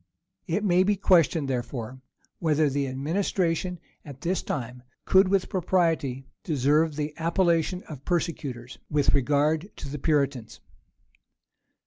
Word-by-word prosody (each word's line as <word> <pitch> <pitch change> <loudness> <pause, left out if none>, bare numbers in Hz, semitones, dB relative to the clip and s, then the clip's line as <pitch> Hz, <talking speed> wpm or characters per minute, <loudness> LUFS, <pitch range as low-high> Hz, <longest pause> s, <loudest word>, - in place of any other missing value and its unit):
It 190 +5 -1
may 180 -3 +4
be 205 +2 +3
questioned, 170 -5 +3
therefore, 125 -1 -4 0.4
whether 155 -3 +2
the 140 0 -1
administration 170 +5 -1 0.2
at 140 -3 -11
this 180 +2 -1
time 125 -2 -5 0.2
could 190 0 +5
with 195 -1 +1
propriety 165 -8 0 0.2
deserve 150 +1 +2
the 150 0 -3
appellation 170 +1 +1
of 145 -4 -10
persecutors 140 -8 -3
with 145 -2 +2
regard 150 +6 +1
to 140 - -7
the 145 +1 -5
Puritans. 140 -6 0
155 Hz, 120 wpm, -26 LUFS, 135-175 Hz, 0.4 s, could